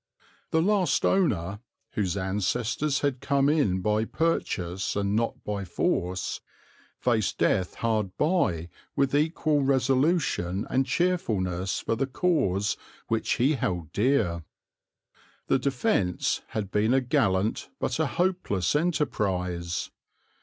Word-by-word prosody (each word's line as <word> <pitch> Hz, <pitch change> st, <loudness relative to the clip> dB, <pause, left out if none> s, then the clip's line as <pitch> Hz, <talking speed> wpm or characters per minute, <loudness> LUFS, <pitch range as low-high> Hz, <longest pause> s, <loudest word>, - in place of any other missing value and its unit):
The 160 Hz, 0 st, +2 dB
last 200 Hz, -2 st, +2 dB
owner, 100 Hz, -, +1 dB, 0.3 s
whose 100 Hz, -3 st, -1 dB
ancestors 115 Hz, +8 st, 0 dB
had 135 Hz, -4 st, -1 dB
come 140 Hz, -1 st, +2 dB
in 115 Hz, -, +2 dB
by 105 Hz, +3 st, +1 dB
purchase 95 Hz, -, -1 dB
and 100 Hz, 0 st, 0 dB
not 115 Hz, +1 st, -1 dB
by 100 Hz, -1 st, -3 dB
force, 90 Hz, 0 st, -1 dB, 0.6 s
faced 115 Hz, -5 st, 0 dB
death 90 Hz, -2 st, +1 dB
hard 110 Hz, -5 st, -1 dB
by 150 Hz, -, +1 dB, 0.3 s
with 135 Hz, -1 st, +1 dB
equal 150 Hz, 0 st, +2 dB
resolution 135 Hz, -, +1 dB
and 130 Hz, +1 st, +2 dB
cheerfulness 100 Hz, -, 0 dB
for 115 Hz, -, -1 dB
the 135 Hz, +4 st, -1 dB
cause 115 Hz, -, +1 dB, 0.3 s
which 115 Hz, -1 st, +1 dB
he 135 Hz, +6 st, +2 dB
held 90 Hz, -, -2 dB
dear. 105 Hz, -8 st, +1 dB, 1.0 s
The 135 Hz, -, +2 dB
defence 125 Hz, -9 st, 0 dB
had 100 Hz, -3 st, -4 dB
been 110 Hz, +4 st, +2 dB
a 135 Hz, -, +3 dB
gallant 100 Hz, -4 st, +1 dB
but -, -, -1 dB
a -, -, +2 dB
hopeless 175 Hz, -, 0 dB
enterprise. 90 Hz, -, -1 dB
110 Hz, 120 wpm, -27 LUFS, 95-140 Hz, 1.0 s, a